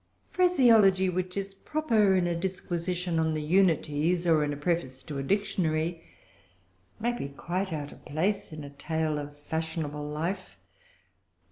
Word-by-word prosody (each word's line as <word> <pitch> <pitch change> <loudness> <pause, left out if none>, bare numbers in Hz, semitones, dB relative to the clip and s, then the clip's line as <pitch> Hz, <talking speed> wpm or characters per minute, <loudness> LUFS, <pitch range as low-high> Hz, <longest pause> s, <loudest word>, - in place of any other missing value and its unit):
Phraseology 225 - +5
which 180 +1 -3
is 195 0 -3
proper 220 -5 +2
in 180 -1 +2
a 175 - +1
disquisition 175 -1 -2
on 160 -1 +1
the 155 - -1
Unities, 170 -1 +2
or 160 -3 +4
in 145 - -1
a 145 - -4
preface 145 -5 -2
to 145 -3 -5
a - - -2
Dictionary, 165 -2 0 1.0
may 235 +2 +1
be 140 - -4
quite 180 +7 -3
out 145 -2 -4
of - - -15
place 180 +8 -1
in 155 -1 -7
a 140 - -8
tale 155 +1 -1
of 145 0 -8
fashionable 155 -1 -3
life. 175 +6 -4
170 Hz, 150 wpm, -28 LUFS, 150-190 Hz, 1.0 s, Phraseology